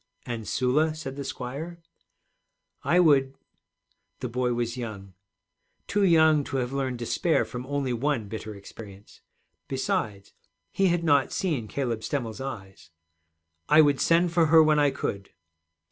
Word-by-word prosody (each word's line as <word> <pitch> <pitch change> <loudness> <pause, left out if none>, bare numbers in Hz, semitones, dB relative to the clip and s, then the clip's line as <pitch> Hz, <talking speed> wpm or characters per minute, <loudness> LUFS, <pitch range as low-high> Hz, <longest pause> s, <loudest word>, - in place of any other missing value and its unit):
'And 115 -3 -5
Sula?' 150 +5 +1
said 135 -4 -6
the 140 - -5
squire. 140 +7 -6 1.0
'I 170 +6 +3
would 135 -5 +3 0.4
' - - -48
The 125 - -3
boy 125 +1 -1
was 120 -1 -2
young, 105 -6 -7 0.7
too 205 0 0
young 160 -4 +5
to 135 - -3
have 125 0 -2
learned 130 -2 -2
despair 155 +8 0
from 125 0 -7
only 140 -3 -1
one 120 -2 -1
bitter 110 0 -7
experience. 100 0 -13 0.5
Besides, 100 -2 -2 0.4
he 195 - +2
had 175 -1 +1
not 145 -4 +3
seen 150 - -2
Caleb 120 -2 -2
Stemmel's 115 -1 -4
eyes. 100 -11 -8 0.8
'I 155 +1 +7
would 145 -3 +2
send 170 +1 +3
for 170 -2 +4
her 160 +1 +7
when 155 -1 +3
I 145 -1 +4
could.' 100 -7 -4
135 Hz, 145 wpm, -26 LUFS, 115-155 Hz, 1.0 s, I